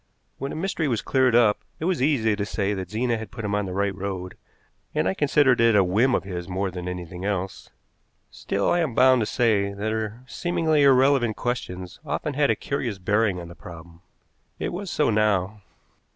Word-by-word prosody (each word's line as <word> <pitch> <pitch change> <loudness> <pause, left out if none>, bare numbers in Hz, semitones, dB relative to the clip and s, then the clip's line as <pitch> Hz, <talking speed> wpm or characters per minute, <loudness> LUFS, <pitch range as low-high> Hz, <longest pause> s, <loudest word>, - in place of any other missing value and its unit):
When 135 +1 -4
a - - -5
mystery 165 -1 -1
was 120 -5 -1
cleared 130 -3 +2
up, 115 -4 +4 0.2
it 160 - -3
was 180 -6 0
easy 125 -7 +2
to 100 - -2
say 100 0 -1
that 95 -2 -5
Zena 115 +1 -1
had 110 -2 -7
put 115 0 -7
him 105 - -2
on 105 -1 0
the - - -5
right 100 0 0
road, 95 -2 -5 0.6
and - - +1
I 95 - +1
considered 140 -1 +3
it 115 -2 +5
a 100 - +6
whim 110 +8 +2
of - - -1
his 90 -2 -6
more 95 +1 -2
than 90 0 -6
anything 90 0 -6
else. 95 -2 -3 0.6
Still 100 - -2
I 175 - +2
am 155 -9 -1
bound 130 0 +5
to 105 - -1
say 105 -5 +1
that 105 +2 -2
her 110 +2 -4
seemingly 160 +2 0
irrelevant 135 -4 +4
questions 95 -7 -4
often 150 0 -3
had 145 0 +2
a - - +3
curious 125 -7 -3
bearing 100 0 +1
on 85 - -8
the 85 - -10
problem. 85 0 -12 0.6
It - - -3
was 190 +1 -5
so 150 -7 +1
now. 105 -1 +1
110 Hz, 205 wpm, -24 LUFS, 95-130 Hz, 0.6 s, a